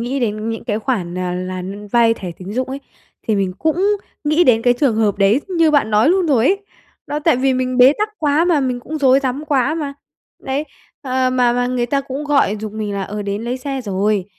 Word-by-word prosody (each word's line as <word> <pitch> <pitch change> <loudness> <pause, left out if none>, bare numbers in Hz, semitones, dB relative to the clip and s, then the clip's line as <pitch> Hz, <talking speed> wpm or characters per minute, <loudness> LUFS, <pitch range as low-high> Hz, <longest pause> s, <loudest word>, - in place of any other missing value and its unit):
nghĩ 255 +4 -2
đến 215 -2 -2
những 225 0 -4
cái 210 -2 -1
khoản, 185 -7 -2
à, 180 -1 -2
là 185 0 -4 0.3
vay 230 -1 +4
thẻ 185 -5 -7
tín 190 +2 -7
dụng 255 +3 -2
ấy, 275 +1 -5 0.5
thì 220 - +2
mình 195 -2 0
cũng 370 +6 +1 0.3
nghĩ 305 +4 +3
đến 230 -5 +4
cái 245 0 +4
trường 260 -7 +2
hợp 210 -3 +1
đấy 200 +7 +3
như 335 -4 +3
bạn 285 -7 +2
nói 215 +6 +4
luôn 365 +1 +2
rồi 255 -7 +3
ấy. 390 +5 +3 0.5
Đó, 295 - -2
tại 305 -3 +2
vì 265 +1 +2
mình 255 0 -1
bế 255 +2 +8
tắc 425 +1 0
quá 300 +1 +2
mà, 340 -4 +2
mình 250 -2 -1
cũng 310 +5 -5
rối 270 -1 +4
rắm 270 +2 -3
quá 285 0 +1
mà. 295 -4 -3 0.5
Đấy, 270 +3 -2 0.4
ờ, 255 -1 0
mà 250 -1 +2
mà 245 0 0
người 245 -1 -1
ta 275 +3 0
cũng 275 +2 -6
gọi 275 -8 +2
giục 215 -1 -5
mình 215 -1 -4
là, 200 - -2
ờ, 210 +2 -5
đến 200 +1 -3
lấy 245 +2 -2
xe 270 0 -4
rồi. 200 -2 0
255 Hz, 240 wpm, -18 LUFS, 215-285 Hz, 0.5 s, bế